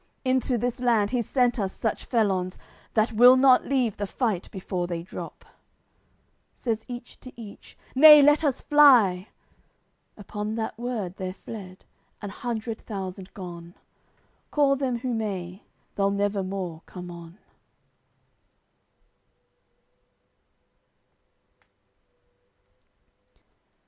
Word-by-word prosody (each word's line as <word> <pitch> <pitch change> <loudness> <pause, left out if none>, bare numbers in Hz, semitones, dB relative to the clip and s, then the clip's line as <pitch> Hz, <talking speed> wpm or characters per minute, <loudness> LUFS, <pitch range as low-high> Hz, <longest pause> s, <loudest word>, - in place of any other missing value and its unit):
Into 255 -1 +1
this 245 +2 -2
land 225 -5 +2
he's 240 -4 -2
sent 250 -2 +1
us 195 -2 -2
such 220 - -3
felons 195 -6 0 0.4
That 220 +1 +2
will 245 +3 +7
not 260 -1 +5
leave 250 -6 0
the 205 - -3
fight 215 -5 -2
before 180 -2 -4
they 170 -1 -4
drop." 180 - -9 1.1
Says 225 -3 -3
each 245 0 -9
to 255 - -11
each: 210 -3 -12 0.2
"Nay 300 +2 +9
let 295 +2 +4
us 280 -4 0
fly!" 235 -11 +5 0.9
Upon 210 +1 -5
That 225 -1 -4
word, 225 -7 -4
they're 185 0 -5
fled, 190 -3 -10 0.3
an 205 -2 -7
hundred 225 0 -5
thousand 190 -2 -7
gone; 175 -2 -9 0.7
Call 280 -2 +2
them 260 -3 -2
who 245 +1 -3
may, 195 -4 -4 0.3
they'll 200 0 +1
never 200 0 -1
more 185 -4 -5
come 180 -1 -9
on. 170 +1 -12
215 Hz, 110 wpm, -25 LUFS, 190-245 Hz, 1.1 s, Nay